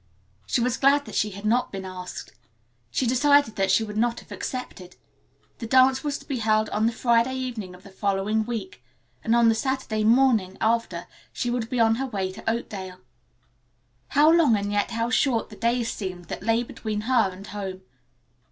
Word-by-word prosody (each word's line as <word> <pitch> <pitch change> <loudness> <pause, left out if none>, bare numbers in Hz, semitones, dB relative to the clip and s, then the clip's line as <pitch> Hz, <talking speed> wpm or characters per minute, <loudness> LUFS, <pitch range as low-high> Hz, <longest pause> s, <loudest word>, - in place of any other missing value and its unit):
She - - +1
was 250 +1 0
glad 285 +1 +3
that - - -10
she 210 - +1
had 200 +1 -9
not 240 +4 +1
been 195 -1 -6
asked. 185 -1 -8 0.6
She 255 - -1
decided 285 0 +3
that 195 -1 0
she 195 +4 +4
would 210 -1 -6
not 235 +1 +1
have - - -21
accepted. 185 -8 -6 0.6
The 230 - -5
dance 260 +2 +4
was 290 -1 -2
to - - -15
be 270 -4 -2
held 215 -1 +2
on 215 +2 +1
the - - +1
Friday 235 +2 +2
evening 235 -8 -5
of 180 - -17
the 200 - -13
following 200 +2 0
week, 215 - -6 0.4
and 225 - +2
on 235 -1 +5
the 225 - +5
Saturday 230 -2 -2
morning 225 -5 +3
after 220 -7 0 0.3
she 245 - -2
would 240 -2 -2
be 250 - -1
on 225 -1 +4
her 270 - -1
way 195 -6 -3
to 190 - -4
Oakdale. 190 -5 -5 1.1
How 300 +2 +5
long 320 -10 +4
and 200 0 -3
yet 205 0 0
how 230 +1 -2
short 240 -4 +1
the - - -9
days 235 +1 0
seemed 180 -4 -6
that - - -5
lay 225 +4 +1
between 215 -3 -4
her 230 -3 +2
and 190 +2 -11
home. 195 -3 -6
225 Hz, 195 wpm, -25 LUFS, 200-245 Hz, 1.1 s, on